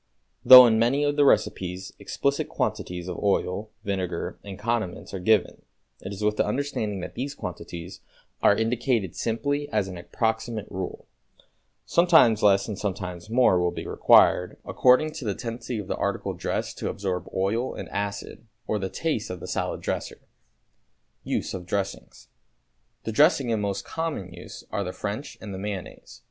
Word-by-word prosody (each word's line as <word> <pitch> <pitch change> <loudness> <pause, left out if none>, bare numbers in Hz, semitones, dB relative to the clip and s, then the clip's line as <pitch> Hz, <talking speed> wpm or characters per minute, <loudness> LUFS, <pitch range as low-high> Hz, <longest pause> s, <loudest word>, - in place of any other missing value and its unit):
Though 125 0 +12
in 110 -2 +3
many 130 +6 +2
of 145 0 +1
the 145 -1 +4
recipes 95 -7 +1
explicit 140 0 -1
quantities 90 0 -3
of 90 - -5
oil, 100 +1 0
vinegar 95 -4 -3
and 100 -2 -8
condiments 110 -5 -3
are 95 - -3
given, 105 +2 +2 0.4
it 95 - -7
is 100 +1 -6
with 105 0 +1
the - - +3
understanding 105 -5 -2
that - - -7
these 140 +3 -4
quantities 85 - -7 0.4
are 100 - +5
indicated 115 -3 0
simply 145 +6 -1
as 105 -3 0
an 90 -2 -7
approximate 110 +2 -2
rule; 95 0 -5 0.8
sometimes 160 -11 +5
less 100 -1 +4
and 105 -3 -5
sometimes 90 -2 -4
more 115 -6 +4
will 90 0 +2
be - - -6
required, - - +4
according 130 +5 +4
to 155 -5 -7
the 100 -3 -1
tendency 120 0 -5
of 105 - -4
the - - -2
article - - -2
dressed - - -3
to - - -2
absorb 95 -2 -3
oil 105 +7 -1
and - - -6
acid, 100 +2 -5 0.2
or 110 - -1
the 95 -1 -3
taste 155 - -2
of 90 - -5
the - - -8
salad - - -3
dresser. - - -4 1.0
=Use - - -2
of 90 -2 -6
Dressings.= 100 0 -4 0.8
The 115 - -3
dressings 140 -1 +4
in 110 - 0
most 100 -1 -2
common 155 - -4
use 85 - -10
are 100 - -1
the 90 -1 -5
French 105 +7 -5
and 105 -2 -7
the 95 - -6
mayonnaise. 100 -2 -7
105 Hz, 165 wpm, -26 LUFS, 95-120 Hz, 1.0 s, Though